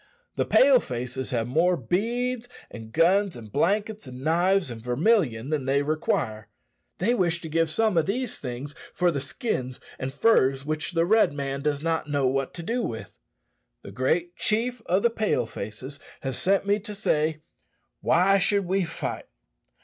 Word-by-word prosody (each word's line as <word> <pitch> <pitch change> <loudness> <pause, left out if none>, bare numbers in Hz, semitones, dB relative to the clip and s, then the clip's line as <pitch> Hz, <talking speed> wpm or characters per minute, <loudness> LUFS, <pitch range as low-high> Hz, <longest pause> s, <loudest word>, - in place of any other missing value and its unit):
The - - 0
Pale 265 -1 +6
faces 125 - -4
have 115 -3 0
more 170 +7 +2
beads, 235 - -1 0.2
and 110 -1 -9
guns, 185 - +3
and 110 -3 -10
blankets, 205 - 0
and 130 +1 -9
knives, 175 0 +2
and 115 -1 -7
vermilion 130 - +1
than 150 -4 -1
they 140 +2 +2
require; 115 -8 -1 0.5
they 225 +7 +2
wish 175 -7 +1
to 160 - -6
give 165 +1 +1
some 215 +2 +1
of 160 - -1
these 245 +4 -1
things 130 +2 -5 0.2
for 175 -1 +3
the 140 -4 -2
skins 130 - -3 0.2
and 130 - -3
furs 135 -5 +3
which 155 +4 -3
the 165 0 +2
Red 215 -5 +4
man 140 -1 -3
does 145 0 -1
not 165 -2 -1
know 145 -2 +1
what 135 +1 0
to 170 - -6
do 235 +7 -1
with. 110 - -6 0.6
The - - -9
great 170 +7 0
chief 235 +3 0
of 185 +3 +2
the 235 - +4
Pale 215 - 0
faces 115 +7 -7 0.2
has 135 -2 -3
sent 195 +6 +2
me 205 +1 +2
to 210 0 -7
say, 155 -5 0 0.6
Why 190 +4 +4
should 200 +1 +2
we 190 +2 +1
fight? 165 0 -5
165 Hz, 170 wpm, -26 LUFS, 135-200 Hz, 0.6 s, Pale